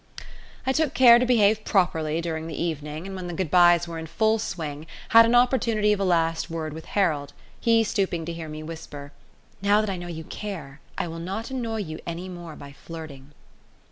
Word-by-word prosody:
I 265 - +2
took 305 0 0
care 240 -2 +8
to 250 - +1
behave 215 -3 +3
properly 165 -6 +1
during 160 -1 -4
the 160 - -6
evening, 155 -1 -4
and 195 0 -6
when 185 -1 -6
the 175 - -5
good 185 -5 -2
byes 175 -1 +5
were 165 -1 -6
in 160 - -7
full 220 +6 +1
swing 155 -6 -5 0.2
had 230 0 +8
an 235 - +3
opportunity 235 -4 +3
of 205 - -2
a - - 0
last 165 -2 +1
word 160 -2 -4
with 160 +1 -9
Harold, 150 -8 +1 0.3
he 230 -1 +3
stooping 185 -6 -1
to 170 - -4
hear 165 -1 -7
me 155 0 -7
whisper: 150 -3 -8 0.5
"Now 205 +1 +4
that 215 -2 -1
I 190 - -3
know 175 0 -7
you 160 -2 -6
care, 155 -7 -7 0.2
I - - -1
will 165 0 -6
not 195 +8 -5
annoy 230 -4 -2
you 155 -4 -6
any 170 +2 -5
more 175 -3 -8
by 140 - -11
flirting." 145 -2 -10
175 Hz, 205 wpm, -25 LUFS, 160-210 Hz, 0.5 s, care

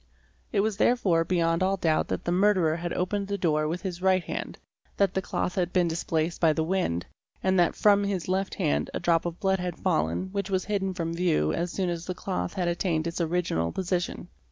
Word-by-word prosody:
It 200 - +2
was 215 -1 -1
therefore 195 -8 +3
beyond 165 -1 +1
all 190 +1 +2
doubt 160 -3 +1
that - - -3
the 175 - 0
murderer 180 -4 +3
had 170 0 -4
opened 200 +2 -1
the 200 0 -2
door 155 -4 +1
with 170 +5 -3
his 180 -2 -4
right 185 -1 +3
hand, - - -5 0.4
that 195 -2 +2
the 190 - 0
cloth 180 - -2
had 180 -1 -1
been 180 -2 +2
displaced 165 0 -1
by 160 -2 +5
the 160 - 0
wind, 160 - -1 0.4
and 190 -1 +3
that 175 - +3
from 205 -1 +4
his 195 -4 -2
left 190 +1 -1
hand 70 +1 0
a - - -1
drop 170 0 +2
of 170 0 -6
blood 190 -2 +1
had 180 -2 -3
fallen 80 - 0
which 200 0 -3
was 190 -1 0
hidden 195 -3 -1
from 165 -2 -2
view 170 - +1
as 170 0 -2
soon 190 -1 -1
as 170 0 -4
the 185 - -3
cloth 90 - -3
had 180 -2 0
attained 170 -2 0
its 170 +1 -2
original 165 - 0
position. 180 -1 -2
180 Hz, 220 wpm, -27 LUFS, 165-190 Hz, 0.4 s, by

